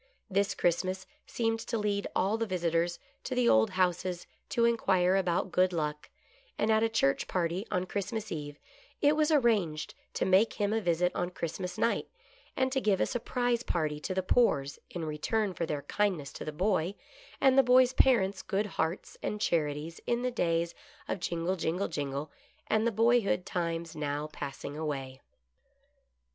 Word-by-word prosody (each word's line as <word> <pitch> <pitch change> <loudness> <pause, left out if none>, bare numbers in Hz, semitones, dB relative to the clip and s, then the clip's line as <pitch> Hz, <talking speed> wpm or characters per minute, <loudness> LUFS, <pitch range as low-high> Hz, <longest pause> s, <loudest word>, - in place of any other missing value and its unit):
This 195 0 +1
Christmas 185 +2 0 0.2
seemed 225 -1 0
to 230 +1 -3
lead 205 -1 -1
all 195 +4 +2
the 225 0 -1
visitors 170 -2 0 0.3
to 255 - -3
the 250 -1 +3
old 110 0 +5
houses 180 -1 0 0.2
to 235 - +2
inquire 190 -6 +3
about 185 -1 0
Good 185 0 +3
Luck, 150 -3 -3 0.5
and 215 - +2
at 220 0 +4
a 225 - +2
church 180 -12 +1
party 180 +4 -1
on 180 0 0
Christmas 210 +3 -4
eve, 145 -2 -5 0.4
it 295 +1 +4
was 305 0 +2
arranged 215 - +2 0.2
to - - 0
make 190 +4 +4
him 205 0 0
a 225 - +1
visit 175 -1 +1
on 175 0 -1
Christmas 180 +1 -4
night, 230 - +1 0.5
and 260 0 +2
to 265 0 0
give 200 -5 +2
a - - +3
sur 245 - -2
prise 245 0 0
party 155 -9 -1
to 185 +4 -4
the 190 - 0
Poores 140 - +2
in 170 -2 -4
return 185 +7 -1
for 170 -2 -3
their 145 -2 -3
kindness 185 -9 -1
to - - -7
the 155 - -3
boy, 185 +2 0 0.4
and 265 -1 +5
the 270 - +8
boy's 255 0 +5
parents' 200 -9 +3
good 205 +1 -1
hearts 170 -3 -3
and 210 - -3
charities 160 -4 -1
in 240 0 0
the 250 - 0
days 170 -6 0 0.3
of - - -2
jingle, 175 +1 -1
jingle, 180 +2 -1
jingle, 145 -1 -4 0.3
and 220 +1 +2
the - - +2
boyhood 225 -4 +2
times 170 -2 -3
now 145 -1 -2
passing 145 -1 -6
away. 135 -4 -4
185 Hz, 175 wpm, -30 LUFS, 165-220 Hz, 0.5 s, the